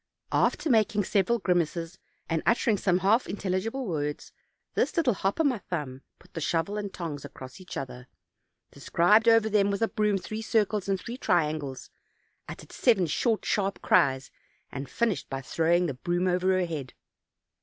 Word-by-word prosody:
After - - +1
making 215 -5 +3
several 205 +5 +1
grynaces, 175 -1 -1 0.3
and 165 -1 -1
uttering 230 -1 +2
some 185 -2 +2
half 225 +5 +3
intelligible 205 +7 -2
words, 150 -6 -3 0.4
this - - 0
little 285 -8 +3
hop 195 +6 -2
o' - - +4
my 260 -7 +1
thumb 145 -8 -5 0.2
put - - -23
the 165 - -5
shovel 165 +6 -1
and 205 -2 -4
tongs 160 -6 -6
across 135 +3 -10
each 180 - -8
other, 125 -2 -7 0.6
described 210 +7 +3
over 225 -1 +5
them 205 -2 +2
with 200 +1 -2
the 225 - +3
broom 210 -3 +1
three 215 +3 -6
circles 210 -3 0
and 195 -1 +1
three 235 +6 -7
triangles, 150 -6 -1 0.6
uttered - - -10
seven 220 -8 +3
short 220 +8 0
sharp 200 -1 0
cries, 135 -1 +2 0.4
and 135 +1 -6
finished 230 -5 -1
by 135 - -3
throwing 170 +5 +2
the 150 - -2
broom 175 +7 -1
over 180 +1 +2
her 180 - +1
head. 150 -7 -6
185 Hz, 165 wpm, -27 LUFS, 160-215 Hz, 0.6 s, over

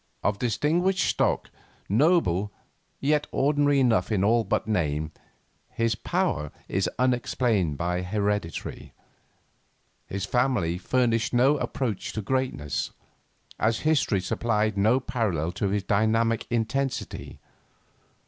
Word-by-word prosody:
Of 100 0 0
distinguished 170 - +1
stock, - - 0 0.4
noble, 105 - +2 0.5
yet 150 +1 +1
ordinary 145 0 +2
enough 115 -7 +2
in 100 -3 +2
all 115 +3 +3
but - - -1
name, 80 -7 -1 0.6
his 115 -2 0
power 75 -7 -1 0.2
is - - 0
unexplained 120 - +1
by 90 +2 -1
heredity; 100 -2 -3 1.1
his 100 0 -3
family 105 -8 +1
furnished 115 +2 +1
no 135 +4 +5
approach 125 -6 -3
to 110 - -3
greatness, 130 - -1 0.7
as 110 +1 +1
history 145 -10 +2
supplied 110 +1 0
no 110 +6 +3
parallel 105 - -1
to 95 +3 -2
his 100 0 -1
dynamic 110 +3 +1
intensity. 125 +4 -2
115 Hz, 110 wpm, -26 LUFS, 100-130 Hz, 1.1 s, no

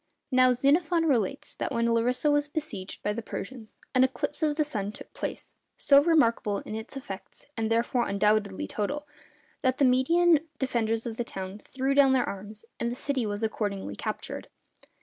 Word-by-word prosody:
Now, 255 -1 +5
Xenophon 320 +6 +2
relates 235 -11 0
that - - -3
when 230 0 +1
Larissa 250 +5 +2
was 290 0 +2
besieged 295 -12 -5
by 210 - 0
the 230 - -4
Persians, 220 0 -7 0.2
an 255 -1 +5
eclipse 260 +5 -1
of 305 -2 +2
the 310 - +2
sun 210 -9 -3
took - - -12
place, - - -5 0.2
so 280 0 +6
remarkable 235 -10 +3
in - - -8
its 220 +5 -6
effects 195 -8 -9
(and 225 -1 -1
therefore 235 +1 +1
undoubtedly 200 - +1
total), 290 - -3 0.5
that 260 -1 +1
the 280 - +4
Median 320 +6 +4 0.2
defenders 230 -4 0
of 225 -2 -4
the 240 - 0
town 190 -2 -6
threw 265 +4 -2
down 275 -1 +6
their 255 -2 +2
arms, 205 +3 -7
and 235 - -1
the - - -3
city 260 -3 -1
was 205 +1 -3
accordingly 200 - -2
captured. - - -5
245 Hz, 175 wpm, -28 LUFS, 215-280 Hz, 0.5 s, so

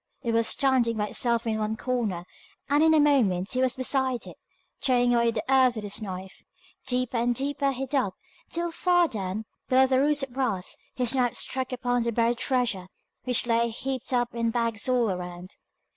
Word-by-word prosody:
It 235 - 0
was 230 0 +2
standing 255 -4 +2
by 210 -1 -1
itself 235 -1 0
in 220 -1 -1
one 215 +1 -2
corner, 220 -9 -2 0.4
and 290 +2 +3
in 320 0 +5
a - - +5
moment 220 -11 +2
he 255 - 0
was 260 -1 +2
beside 260 -1 0
it, - - -10 0.4
tearing 245 -2 +3
away 235 -1 +3
the 230 - -2
earth 260 -2 +4
with 215 - -5
his 205 +2 -3
knife. 190 -2 -7 0.4
Deeper 250 -1 0
and 240 +1 +1
deeper 280 +1 0
he 265 0 -3
dug, 255 -8 -1 0.3
till 340 0 -2
far 350 0 +3
down, 210 -3 -4 0.2
below 260 +1 +5
the 260 0 +2
roots 290 0 +2
of 265 -3 -6
brass, 235 -9 -1 0.2
his 250 -1 0
knife 250 -3 +1
struck 260 -1 -2
upon 245 -1 0
the 235 0 0
buried 235 +1 +1
treasure, 245 -9 0 0.4
which 250 -2 +2
lay 235 0 +2
heaped 260 +3 -4
up 245 -1 0
in 230 -1 0
bags 230 -1 -1
all 245 -4 +2
around. 180 0 -6
245 Hz, 190 wpm, -26 LUFS, 225-260 Hz, 0.4 s, in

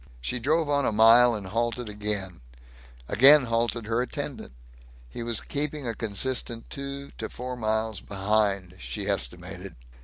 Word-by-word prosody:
She 125 - -3
drove 155 +6 +1
on 145 -1 +1
a - - +1
mile 115 +2 +6
and 105 -2 -6
halted 115 +4 -2
again; 105 -5 -3 0.7
again 140 +5 +7
halted 115 -1 -1
her 115 +2 0
attendant. 140 - -5 0.6
He - - -7
was 115 -1 -2
keeping 150 -1 -3
a 115 - -2
consistent 115 +2 -2
two 140 0 -6
to 110 - -4
four 125 +1 -6
miles 110 -3 -2
behind, 100 -2 0
she 100 -2 -5
estimated. 95 -12 -4
115 Hz, 145 wpm, -26 LUFS, 105-130 Hz, 0.7 s, again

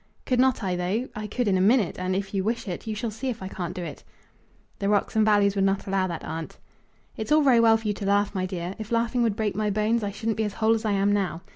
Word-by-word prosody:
"Could 250 -1 +1
not 260 -3 +3
I, 185 -2 0
though? 190 +8 -1
I 215 0 -4
could 240 +3 -1
in 190 -2 +2
a - - +2
minute; 205 -2 +3
and, 185 0 -1
if 195 +1 -3
you 195 -1 0
wish 230 +2 -2
it, 180 +3 -5
you 215 - -2
shall 225 +1 -3
see 255 +5 -4
if 230 -5 -5
I - - -4
can't 180 -2 -5
do 180 - -4
it." - - -8 0.8
"The 200 -1 0
rocks 205 +1 +1
and 220 - +4
valleys 205 -2 +4
would 195 -1 +1
not 195 0 +1
allow 195 -1 0
that, 170 -3 -5
aunt." 160 0 -6 0.6
"It's 220 - -5
all 305 0 +5
very 255 -4 +5
well 225 -1 +6
for 220 -1 -6
you 205 - +1
to 200 - -6
laugh, 200 0 +2
my 185 -2 -1
dear. 180 -1 -4
If 220 0 -7
laughing 235 +1 +1
would 225 -4 +1
break 210 -3 -1
my 210 0 0
bones 215 +3 +1
I 205 - -1
shouldn't 220 +2 -3
be 220 - +1
as 210 -2 -2
whole 220 0 +3
as 225 0 -2
I 210 - +1
am 200 +1 +2
now. 190 -4 -1
205 Hz, 290 wpm, -25 LUFS, 195-225 Hz, 0.8 s, well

